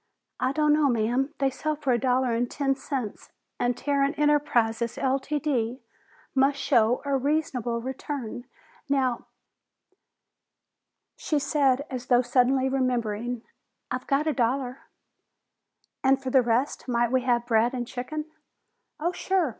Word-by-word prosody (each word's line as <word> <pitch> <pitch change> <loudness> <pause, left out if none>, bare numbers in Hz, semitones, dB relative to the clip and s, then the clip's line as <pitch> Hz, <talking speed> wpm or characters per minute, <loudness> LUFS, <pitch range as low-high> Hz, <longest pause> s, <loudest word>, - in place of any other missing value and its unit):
"I 255 +1 +1
don't 300 +1 +3
know, 300 -2 +3
ma'am. 245 +4 +1
They 270 -1 +1
sell 305 +3 -2
for 285 -4 0
a 240 - +2
dollar 255 -1 +1
and 240 +1 0
ten 275 -2 0
cents, 265 -5 -5 0.3
and 245 0 0
Tarrant 280 0 0
Enterprises, 240 -6 +2
Ltd., 270 -3 -1 0.5
must 275 +1 +3
show 245 -3 +2
a 280 -1 +1
reasonable 265 -4 0
return. 260 -1 -5 0.4
Now 260 -3 0 0.9
" - - -58
She 305 - -1
said, 280 -1 +2
as 250 -1 -5
though 245 0 +4
suddenly 260 +2 +3
remembering, 245 -3 -1 0.5
"I've 255 0 -4
got 280 +2 +2
a 310 - +1
dollar." 255 +1 -1 1.2
"And 265 0 +4
for 265 -1 -4
the 265 - +6
rest 240 +5 0
might 240 -1 +1
we 260 0 +3
have 240 -1 +1
bread 230 0 +3
and 245 -1 -2
chicken?" 300 +6 -5 0.7
"Oh, 340 +3 0
sure! 365 -3 0
260 Hz, 140 wpm, -26 LUFS, 245-280 Hz, 1.2 s, the